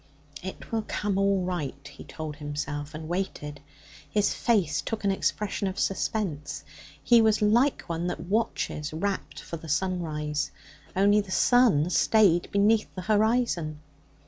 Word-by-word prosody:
'It - - -8
will 225 -1 +1
come 205 -2 -1
all 195 -1 +2
right,' 150 -7 -4
he 140 - -12
told 155 -2 -7
himself, 145 0 -4
and 155 0 -6
waited. 160 -5 -4 0.5
His 210 -1 +2
face 195 -11 +1
took 225 -1 -4
an 200 - +3
expression 200 +1 -1
of 190 +1 -4
suspense. 160 -8 -2 0.4
He 235 +6 +6
was 220 -1 +3
like 235 +7 +3
one 170 0 -3
that 175 - -3
watches, 195 -7 -1
rapt, 195 +5 -3
for 165 - -6
the 160 0 -10
sunrise. 150 -3 -1 0.5
Only 205 +2 +4
the 200 - -11
sun 190 - +4
stayed 190 -7 +4
beneath 210 +2 +3
the 185 - -5
horizon. 215 -7 +1
185 Hz, 145 wpm, -27 LUFS, 155-210 Hz, 0.5 s, He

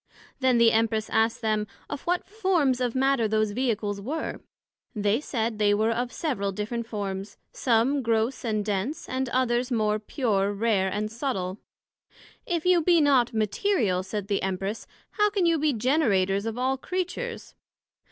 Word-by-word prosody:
Then 260 -2 +3
the 235 -1 +6
Empress 220 -1 +1
asked 225 +1 +2
them, 215 -1 0 0.2
Of 285 - -5
what 355 +1 +1
forms 360 - +1
of 245 -1 -1
Matter 265 -3 +2
those 215 0 +1
Vehicles 210 -4 -1
were? 300 +9 -4 0.6
They 210 +4 +1
said 225 -6 -2
they 205 -1 +4
were 220 +2 +2
of 240 +2 -2
several 205 -11 -2
different 225 +4 -4
forms; 200 -2 -5
some 255 +4 +2
gross 230 +2 0
and 215 -3 -1
dense, 210 +8 -2
and 260 0 -2
others 250 0 +1
more 215 -2 +1
pure, 205 -4 0
rare, 200 -2 +1
and 210 +2 -2
subtil. 210 -6 -3 0.9
If 340 -2 -1
you 360 -1 +5
be 340 +1 +4
not 270 -5 +4
Material, 215 - +1
said 195 +1 -5
the 200 -1 0
Empress, 195 +3 -3 0.2
how 420 -1 +2
can 400 -3 0
you 335 -2 +3
be 300 0 +2
Generators 215 -6 +1
of 225 +1 -4
all 260 +2 0
Creatures? 370 - -4
230 Hz, 160 wpm, -26 LUFS, 210-270 Hz, 0.9 s, the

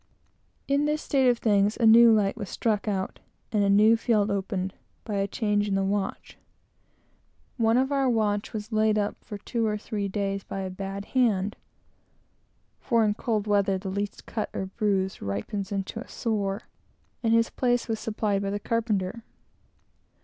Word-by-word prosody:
In 280 +1 +2
this 300 +1 -1
state 265 -3 +3
of 240 - +3
things, 205 -2 +2
a 230 - +2
new 230 +1 +8
light 210 -3 +2
was 205 -4 -6
struck 215 -2 -1
out, 195 -2 -2 0.3
and 210 -2 +2
a 200 - +2
new 210 +3 +6
field 220 -3 +1
opened, 195 -1 -2 0.3
by 210 -3 -3
a 195 0 +1
change 205 0 0
in 195 - 0
the 195 - +1
watch. 195 0 -3 1.2
One 225 0 +3
of 265 +2 +1
our 275 -2 +2
watch 210 -3 0
was 215 +1 -6
laid 215 0 +2
up 205 -1 0
for 205 - -7
two 225 +2 -2
or 210 0 0
three 205 -1 -3
days 195 0 -2
by 195 - -5
a 190 -1 -4
bad 195 +1 -5
hand, 210 -6 +2 1.2
(for 230 -3 +2
in 210 - +2
cold 215 -1 -1
weather 200 -2 +2
the 190 +1 -5
least 200 +1 -4
cut 215 - -3
or 190 - -2
bruise 190 -1 -1
ripens 105 - -4
into 195 +2 -3
a - - -8
sore,) 205 -2 -2 0.6
and 225 - +1
his 230 0 +2
place 245 -2 0
was 225 -2 -2
supplied 215 -2 -1
by 200 - -2
the 205 +1 -2
carpenter. 220 -1 -1
210 Hz, 175 wpm, -26 LUFS, 195-225 Hz, 1.2 s, new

